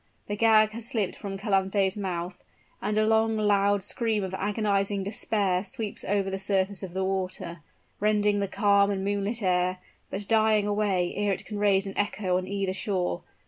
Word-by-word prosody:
The 205 - -3
gag 215 0 +5
has 230 +1 -5
slipped 210 -6 -1
from 195 -1 -6
Calanthe's 195 -1 +1
mouth; 180 -3 -4 0.4
and 210 +2 -1
a 215 - +4
long 220 0 +2
loud 205 -1 +2
scream 225 -4 0
of 190 -1 -4
agonizing 200 0 0
despair 195 -2 0
sweeps 220 -2 -5
over 195 -1 0
the 195 - -3
surface 195 0 0
of 185 -2 -7
the 190 - 0
water 185 -3 -3 0.4
rending 210 -1 +2
the 200 - 0
calm 200 0 +3
and 195 -1 -2
moonlit 205 +3 -1
air 180 0 +1 0.3
but 200 +1 -4
dying 220 -2 +3
away 205 -4 0
ere 205 -1 0
it - - -6
can 210 -1 -5
raise 200 -1 +3
an 195 - -6
echo 195 -3 0
on 185 - -6
either 195 -1 -1
shore. 185 - -2
200 Hz, 180 wpm, -27 LUFS, 190-210 Hz, 0.4 s, gag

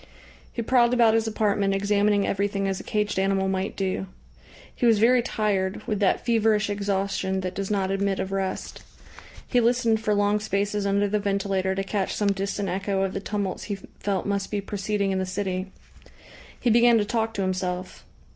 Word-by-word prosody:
He 235 - -3
prowled 245 0 +3
about 230 -2 +5
his 225 0 +1
apartment, 205 -2 +1
examining 205 0 +2
everything 200 0 -1
as 195 -1 -2
a - - -8
caged 210 -3 -1
animal 195 0 +1
might 190 +1 -2
do. 190 0 -2 0.7
He 240 - +1
was 225 -2 +5
very 240 +3 +5
tired, 205 -4 -1
with 210 -4 -1
that 200 -2 +1
feverish 220 -3 +2
exhaustion 195 -1 -1
that 185 0 -4
does 195 0 -4
not 195 -2 0
admit 195 0 0
of 190 - -3
rest. 195 -1 -3 0.7
He 245 - +2
listened 235 -1 +2
for 210 -1 +1
long 205 +1 +2
spaces 205 0 -1
under 200 +1 +2
the 210 +1 0
ventilator 195 -1 0
to 195 - -1
catch 195 -1 -2
some 205 -1 +1
distant 195 +1 -2
echo 195 +1 -1
of 195 - -2
the - - -2
tumults 200 -1 -3
he 205 - -3 0.2
felt 195 -3 -1
must 200 -1 -1
be 205 - -1
proceeding 200 0 -2
in 190 - 0
the 190 - -1
city. 185 0 -2 0.9
He 240 - +2
began 235 +1 +6
to 210 - +1
talk 225 +1 -1
to 195 - -1
himself. 185 -1 -3
200 Hz, 185 wpm, -25 LUFS, 195-215 Hz, 0.9 s, began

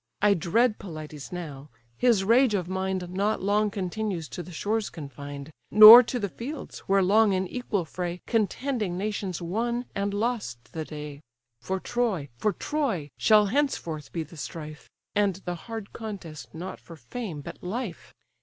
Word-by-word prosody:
I 205 0 +5
dread 210 +6 +2
Pelides 155 -5 -8
now: 150 -5 -7 0.3
his 230 - +3
rage 230 +2 +4
of 180 -3 -1
mind 190 -1 -2
Not 200 +4 0
long 205 +2 +2
continues 190 -3 -3
to - - -6
the 180 - -10
shores 210 +6 -1
confined, 140 0 -8 0.2
Nor 215 +3 +12
to 250 +1 -3
the 205 -4 -1
fields, 265 - -7
where 195 0 +4
long 205 +2 +4
in 190 0 0
equal 210 -5 -2
fray 175 +1 -4
Contending 225 -3 -1
nations 195 -3 -3
won 235 +7 -1
and 200 0 -1
lost 205 - -3
the 160 -1 -4
day; 150 -2 -8 0.4
For 190 +8 -2
Troy, 210 - -1
for 170 - +1
Troy, 225 - -2
shall 215 -1 +6
henceforth 195 - -1
be 165 - -2
the 165 +2 -14
strife, 155 0 -8 0.2
And 200 -2 +2
the 175 - -2 0.2
hard 225 -3 -6
contest 195 -9 -7
not 180 +3 -6
for 165 - -12
fame, 190 -4 -6
but - - -9
life. 195 -1 -5
195 Hz, 160 wpm, -27 LUFS, 165-220 Hz, 0.4 s, Nor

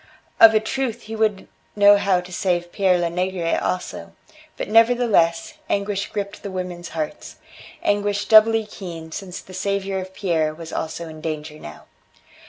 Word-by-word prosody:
Of 220 -1 +9
a - - +6
truth 240 +1 -3
he 220 +1 -7
would 215 -3 0 0.3
know 205 0 +7
how 195 -3 +2
to 180 0 -12
save 175 -1 -1
Pere 190 -3 +2
Lenegre 175 0 -1
also. 180 - -4 0.4
But, - - -4
nevertheless, 225 -7 +3
anguish 200 0 -1
gripped 200 0 -5
the 200 - -6
women's 180 -2 -5
hearts; 155 -1 -5 0.5
anguish 205 0 0
doubly 220 0 +6
keen 170 -6 -9
since 185 0 -7
the 185 - -14
saviour 195 0 -2
of 185 0 -8
Pierre 160 -6 0
was 165 0 -9
also 160 +1 -4
in 155 -1 -10
danger 155 -1 -5
now. - - -11
190 Hz, 155 wpm, -22 LUFS, 170-205 Hz, 0.5 s, Of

